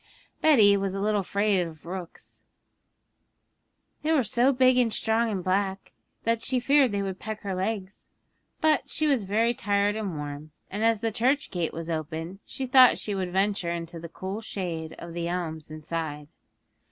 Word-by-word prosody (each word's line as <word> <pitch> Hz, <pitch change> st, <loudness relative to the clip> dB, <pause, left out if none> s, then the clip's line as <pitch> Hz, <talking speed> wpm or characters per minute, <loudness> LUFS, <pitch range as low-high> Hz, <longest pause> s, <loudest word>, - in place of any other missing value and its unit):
Betty 220 Hz, -10 st, +6 dB
was 195 Hz, -1 st, -1 dB
a -, -, -2 dB
little 210 Hz, +1 st, +1 dB
afraid 200 Hz, +1 st, +1 dB
of 165 Hz, -3 st, -5 dB
rooks; 180 Hz, -1 st, -8 dB, 1.6 s
they 310 Hz, -, 0 dB
were 300 Hz, -5 st, +4 dB
so 240 Hz, +5 st, +3 dB
big 255 Hz, -1 st, +4 dB
and 235 Hz, -2 st, +2 dB
strong 225 Hz, +2 st, +1 dB
and 195 Hz, -4 st, -3 dB
black 190 Hz, +1 st, -1 dB, 0.3 s
that 230 Hz, 0 st, +1 dB
she 255 Hz, +2 st, 0 dB
feared 275 Hz, 0 st, +4 dB
they 200 Hz, -1 st, -1 dB
would 190 Hz, -1 st, -4 dB
peck 220 Hz, 0 st, -6 dB
her 200 Hz, -2 st, -3 dB
legs; 190 Hz, +1 st, -4 dB, 0.5 s
but 310 Hz, -1 st, +2 dB
she 310 Hz, -, 0 dB
was 275 Hz, -6 st, +3 dB
very 220 Hz, +4 st, +1 dB
tired 205 Hz, -1 st, +1 dB
and 200 Hz, -7 st, -3 dB
warm, 145 Hz, +1 st, -7 dB, 0.2 s
and 205 Hz, +3 st, -2 dB
as 225 Hz, -2 st, +3 dB
the 225 Hz, -1 st, 0 dB
church 265 Hz, +7 st, +1 dB
gate 175 Hz, -3 st, -1 dB
was 165 Hz, 0 st, -6 dB
open 160 Hz, +3 st, -4 dB
she 265 Hz, -, -4 dB
thought 255 Hz, 0 st, +7 dB
she 210 Hz, -, -3 dB
would 185 Hz, -2 st, -2 dB
venture 195 Hz, -1 st, +1 dB
into 170 Hz, 0 st, -4 dB
the 170 Hz, 0 st, -8 dB
cool 190 Hz, +5 st, -5 dB
shade 170 Hz, -7 st, -5 dB
of 170 Hz, 0 st, -8 dB
the 170 Hz, 0 st, -3 dB
elms 165 Hz, -3 st, -4 dB
inside. 155 Hz, -1 st, -5 dB
200 Hz, 175 wpm, -27 LUFS, 170-225 Hz, 1.6 s, thought